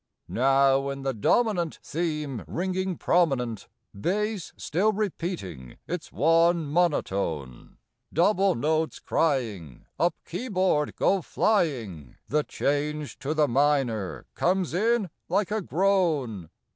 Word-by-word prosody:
Now 135 +2 +3
in 140 0 -5
the 135 -1 0
dominant 175 - +1
Theme 150 -7 -3
ringing 185 +1 -2
prominent, 130 - +1 0.3
Bass 200 - -2
still 195 +8 +1
repeating 170 - -4
its 175 -2 -5
one 165 +1 +3
monotone, 100 - -1 0.3
Double 195 +3 +3
notes 155 +5 0
crying, 110 - -1
Up 175 +1 +2
keyboard 185 -7 0
go 195 -1 +2
flying, 120 - 0
The 150 +1 +2
change 145 -1 -2
to 145 +3 -2
the 150 -1 +3
minor 130 -7 +1
comes 180 -2 0
in 215 0 +1 0.2
like 195 +3 +1
a 215 0 0
groan. 160 - 0
155 Hz, 105 wpm, -26 LUFS, 135-185 Hz, 0.3 s, Now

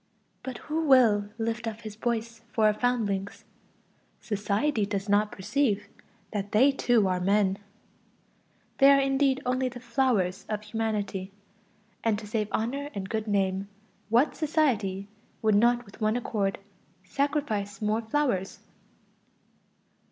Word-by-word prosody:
But 260 -2 -6
who 315 +1 -1
will 220 -7 +5
lift 230 +1 -2
up 225 0 -5
his 215 -2 -8
voice 230 0 -3
for 220 - +2
our 215 - +5
foundlings? 210 -4 -1 0.7
Society 210 +4 0
does 200 0 -2
not 205 +1 +2
perceive 210 0 0 0.5
that 205 -1 -3
they 260 +7 +6
too 240 -6 +2
are 185 -1 0
men; 195 +1 +2 1.2
they 275 0 +8
are 280 0 +7
indeed 270 0 +2
only 255 +1 +1
the 245 0 -9
"flowers" 235 -7 0
of 210 -1 -3
humanity. 210 -3 -3 0.7
And 225 -2 +2
to 215 - -8
save 210 0 -1
honor 275 +6 -2
and 195 -1 -4
good 220 -1 -2
name, 195 -1 0 0.4
what 240 +7 +3
society 230 - 0 0.4
would 215 -1 +4
not 240 +3 +3
with 200 +3 -16
one 215 +1 +2
accord 205 -5 -1 0.5
sacrifice 220 -5 -1
more 215 +1 0
"flowers"? 225 -5 -1
220 Hz, 130 wpm, -27 LUFS, 205-250 Hz, 1.2 s, they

